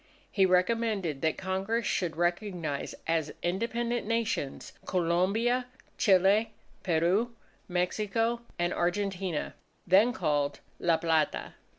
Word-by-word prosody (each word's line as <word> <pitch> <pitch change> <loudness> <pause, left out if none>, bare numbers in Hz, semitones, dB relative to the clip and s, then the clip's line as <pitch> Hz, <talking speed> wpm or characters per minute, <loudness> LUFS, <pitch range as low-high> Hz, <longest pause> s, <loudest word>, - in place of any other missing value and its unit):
He 195 -2 +4
recommended 185 -4 +1
that 160 -1 +1
Congress 195 +5 -1
should 170 -4 -1
recognize 175 -4 -2
as 160 -2 0
independent 230 +5 -1
Nations, 230 -11 -2
Colombia, 195 +8 +1 0.3
Chile, 200 +3 +4 0.3
Peru, 185 +8 +1 0.3
Mexico, 215 +6 0 0.2
and 175 0 0
Argentina, 185 -2 -1 0.3
then 195 +7 +5
called 145 - 0 0.2
La 170 -2 +3
Plata. 160 -2 0
185 Hz, 95 wpm, -29 LUFS, 170-220 Hz, 0.3 s, then